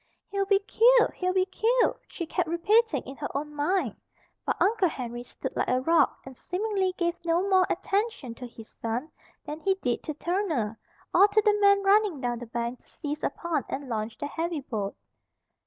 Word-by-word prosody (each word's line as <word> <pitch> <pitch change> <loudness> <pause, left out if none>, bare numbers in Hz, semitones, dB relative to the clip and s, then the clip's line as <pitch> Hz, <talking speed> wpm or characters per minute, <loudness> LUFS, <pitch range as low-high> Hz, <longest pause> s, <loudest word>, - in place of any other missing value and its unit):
"He'll 395 -1 0
be 400 0 +5
killed! 480 +2 +5
He'll 365 0 -1
be 370 0 +3
killed!" 470 +5 +1
she 340 - -5
kept 320 - -1
repeating 425 +7 +2
in 270 - -9
her 290 - -4
own 295 +1 -5
mind. 350 +6 0 0.5
But - - 0
Uncle 400 -3 +3
Henry 240 -4 -5
stood 245 - -7
like - - 0
a 255 - +2
rock 325 +5 +3
and 265 -1 -10
seemingly 385 - -1
gave 345 -1 +1
no 340 +3 +1
more 375 -2 +4
attention 400 - -1
to 250 +2 -8
his 225 -2 -12
son 235 +7 -2 0.3
than 300 0 -5
he 385 +3 +1
did 250 -11 -1
to 305 - -4
Turner, 310 - -1 0.3
or 400 - +7
to 425 +1 +3
the 420 - +5
men 400 0 +5
running 395 -5 +4
down 240 -2 -2
the 245 - -8
bank 235 +2 -3
to - - -31
seize 295 0 -5
upon 325 -1 -1
and 275 -1 -4
launch 220 -1 -3
the - - -4
heavy 325 +1 -3
boat. 210 -7 -4
335 Hz, 190 wpm, -27 LUFS, 255-395 Hz, 0.5 s, or